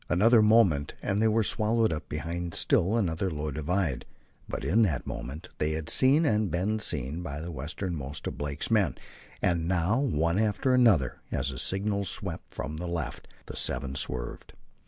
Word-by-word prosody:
Another 110 +6 +5
moment 105 -10 +4
and 100 +2 0
they 110 - +4
were 110 +1 +3
swallowed 110 -1 +2
up 75 -1 -6
behind 85 +3 -4
still 100 +7 +2
another 95 -3 0
low 75 -2 -3
divide, 75 -1 -1 0.5
but - - -4
in 110 +7 +3
that 95 -9 +1
moment 75 +8 -6
they 75 +1 0
had 80 0 0
seen 140 +5 +5
and 105 -5 +2
been 95 +7 0
seen 75 - -1
by 75 -4 -5
the 85 +2 -6
westernmost 75 -1 -5
of - - -3
Blake's 75 +6 -4
men, 100 - +2 0.5
and 85 -2 +1
now, 90 +6 +1
one 85 - +1
after 110 +4 +1
another 100 - +3
as 70 +1 -1
the 65 - -7
signals 100 -1 -1
swept - - -5
from 75 +3 -5
the 90 +2 -4
left, 85 -1 -4 0.2
the - - -8
seven 65 -1 -1
swerved. 60 -3 -4
85 Hz, 175 wpm, -28 LUFS, 75-105 Hz, 0.5 s, Another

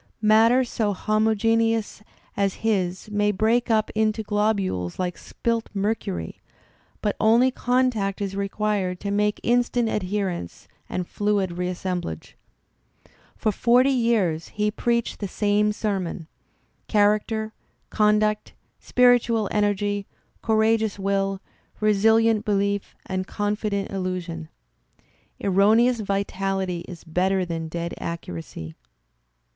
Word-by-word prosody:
' - - -46
Matter 230 +4 +5
so 220 -4 -1
homogeneous 220 +1 +1 0.3
as 200 -1 0
his 190 -2 -1
may 210 0 +2
break 225 +5 +1
up 220 -1 +2
into 220 0 +1
globules 205 - -1
like 180 -1 -2
spilt 230 -1 -3
mercury, 195 - -2 0.6
but 210 - 0
only 235 +4 +4
contact 245 -6 0
is 195 -1 -3
required 200 -2 -1
to 200 - -3
make 210 +1 +1
instant 240 -1 +2
adherence 185 - -3 0.2
and 180 - -2
fluid 205 -3 0
reassemblage. 180 - -4 1.0
For 215 - 0
forty 245 +6 +4
years 220 -10 +1
| - - -27
he 210 0 +1
preached 235 +1 -1
the 205 - -3
same 210 +2 +1
sermon 195 -6 -3 0.3
— - - -43
character, 215 +1 +1 0.4
conduct, 210 0 +2 0.3
spiritual 240 -3 +3
energy, 205 -1 0 0.3
courageous 220 -1 +2
will, 195 0 -1 0.4
resilient 220 +1 +3
belief 200 -1 -1
and 185 0 -3
confident 205 -1 -2
illusion. 180 -4 -4 0.9
Erroneous 220 +5 +3
vitality 195 -2 -2
is 170 -2 -10
better 185 +3 0
than 165 -2 -4
dead 170 +1 -4
accuracy. 85 - -6
205 Hz, 110 wpm, -24 LUFS, 190-220 Hz, 1.0 s, Matter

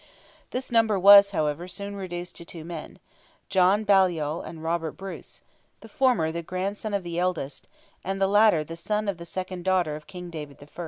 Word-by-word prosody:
This 255 0 -4
number 225 -3 +3
was, 200 +1 +9
however, 155 -2 -2
soon 200 +2 -6
reduced 180 -2 -6
to 170 - -9
two 165 -1 -10
men—John 185 +4 -2
Baliol 175 -6 +2
and 160 -1 -9
Robert 165 -1 -1
Bruce—the 195 +3 -12
former 240 -10 +2
the 170 +1 -4
grandson 195 +5 -3
of 200 - -2
the 170 0 -4
eldest, 175 -6 -3 0.4
the 195 +1 0
latter 205 -5 +4
the 165 +2 -8
son 210 +5 -2
of 195 -4 -2
the 170 - -9
second 185 0 -5
daughter 180 -5 +1
of 150 0 -11
King 180 -2 -9
David 150 -3 -8
I. 145 - -13
180 Hz, 170 wpm, -26 LUFS, 165-200 Hz, 0.4 s, was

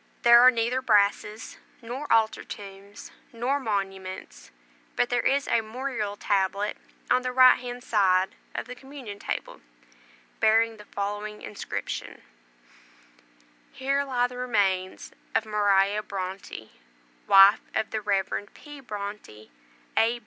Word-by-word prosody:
There 235 -1 +8
are 250 - +9
neither 240 +1 0
brasses, 210 -1 +1 0.2
nor 255 +5 -6
altar 220 -1 +2
tombs, 200 0 -10 0.2
nor 245 +5 -1
monuments, 195 -5 -5 0.5
but 245 - +1
there 245 -1 +2
is 280 +1 +1
a 230 - +2
mural 220 -2 -4
tablet 200 +1 0 0.4
on 255 - +4
the 255 0 -3
right 255 0 +7
hand 245 0 -7
side 190 -5 +2 0.2
of - - -3
the 250 - -8
communion 255 -5 -10
table, - - -5 0.8
bearing 225 +1 +3
the 210 - -13
following 205 +1 -5
inscription: 205 - -6 1.5
HERE 275 +1 0
LIE 250 -3 0
THE 250 0 -6
REMAINS 195 -6 -1 0.2
OF 225 - +2
MARIA 205 -1 +2
BRONTE, 190 -1 -6 0.8
WIFE 195 +1 +7
OF 220 - -1
THE 220 - -2
REV. 200 0 -1
P. 295 -1 -12
BRONTE, 205 - -8 0.5
A. 230 +2 +3
215 Hz, 125 wpm, -26 LUFS, 200-245 Hz, 1.5 s, are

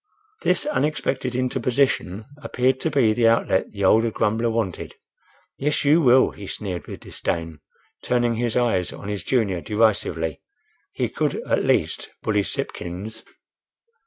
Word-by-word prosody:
This - - +2
unexpected 140 - -1
interposition 125 -5 0 0.2
appeared 130 -2 +1
to 160 - 0
be 125 -8 +3
the 115 0 +3
outlet 115 -4 +2
the 100 -1 -5
older 115 +4 +5
grumbler 110 +2 0
wanted. 110 -6 -3 0.6
"Yes, 150 +1 0
you 155 +4 +5
will!" 130 -2 +5
he 100 - -10
sneered 95 -4 -5
with - - -8
disdain, 80 -2 -4 0.4
turning 120 -1 +1
his 115 0 -1
eyes 115 -8 +1
on 100 - -8
his 105 -3 -3
junior 100 -5 0
derisively. 105 -7 0 0.5
He - - -1
could - - -1
at - - +1
least - - +1
bully 105 -2 +2
Sipkins. 100 +3 -5
115 Hz, 135 wpm, -23 LUFS, 100-125 Hz, 0.6 s, older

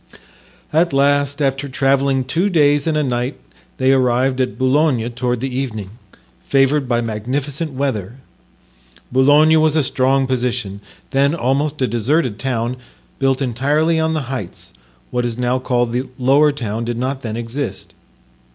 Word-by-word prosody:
At 165 +1 +2
last, 145 +1 +2
after 135 +1 -1
traveling 135 0 +1
two 165 +10 0
days 145 -3 +3
and 155 -1 +1
a 150 - +1
night, 125 -1 -2 0.4
they 130 +1 +3
arrived 130 0 +2
at 125 - -2
Boulogne 130 -2 +2
toward 125 0 -2
the 130 -1 -3
evening, 110 -7 -4 0.5
favored 135 0 +2
by 120 -1 +1
magnificent 130 +7 -3
weather. 125 -6 -2 1.0
Boulogne 145 +5 +5
was 155 -1 +2
a 155 - +3
strong 135 +1 +1
position, 120 -6 -2 0.3
then 140 +3 +2
almost 140 0 0
a - - +2
deserted 120 +1 0
town, 125 -1 -2 0.4
built 135 0 +1
entirely 145 +7 +1
on 160 0 0
the 155 - -1
heights; 130 -8 -7 0.4
what 125 - 0
is 120 -1 -3
now 125 +1 0
called 120 -2 0
the 125 +2 -2
lower 140 +4 +4
town 115 -5 -4
did 120 0 -3
not 130 +2 -2
then 110 -2 -4
exist. 120 +5 -5
130 Hz, 150 wpm, -18 LUFS, 120-145 Hz, 1.0 s, Boulogne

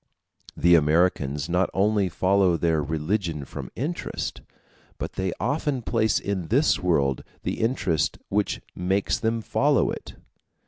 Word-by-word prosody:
The 85 0 +4
Americans 75 -3 +2
not 90 +1 +1
only 100 -1 +2
follow 95 0 +2
their 80 -2 +1
religion 80 +1 -2
from - - -7
interest, 155 +8 -4 0.6
but - - -5
they 95 -1 -1
often 145 -4 -1
place 110 -2 +1
in 95 -4 -3
this 125 - +3
world 70 -8 +1 0.2
the - - -3
interest 105 - 0
which 105 +1 -1
makes 95 +2 0
them 115 0 0
follow - - +2
it. - - -8
95 Hz, 130 wpm, -25 LUFS, 80-105 Hz, 0.6 s, The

